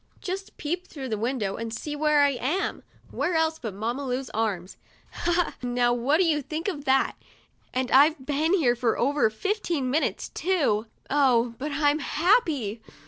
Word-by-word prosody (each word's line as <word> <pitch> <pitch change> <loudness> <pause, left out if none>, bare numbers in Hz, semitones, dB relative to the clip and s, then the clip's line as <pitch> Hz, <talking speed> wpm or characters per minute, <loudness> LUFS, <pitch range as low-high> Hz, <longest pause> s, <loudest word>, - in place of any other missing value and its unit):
Just 385 0 -6
peep 350 +5 -3
through 270 -4 -7
the 220 - 0
window, 225 -4 -1
and 230 0 -4
see 295 +6 -5
where 300 0 +3
I 285 - +5
am! 280 +8 -2 0.3
Where 350 - -1
else, 320 0 +1
but 220 -5 -5
in - - -12
Mamma 235 +6 -2
Lu's 255 -2 -3
arms? 200 -5 -2 0.4
Ha, 345 - -2
ha! 345 0 +1
Now 245 -1 +1
what 250 +6 +2
do 370 - +3
you 305 -3 +2
think 315 +5 -4
of 300 -7 -3
that? 265 0 +2 0.6
And 255 0 -2
I've 285 +1 +5
been 305 +5 +1
here 255 -10 +3
for 240 -2 0
over 280 -2 +2
fifteen 335 - -2
minutes, 310 +4 0
too. 285 - 0 0.2
Oh, 250 -5 +3
but 295 +3 -3
I'm 290 +1 +2
happy 295 - +1
280 Hz, 180 wpm, -26 LUFS, 240-320 Hz, 0.6 s, I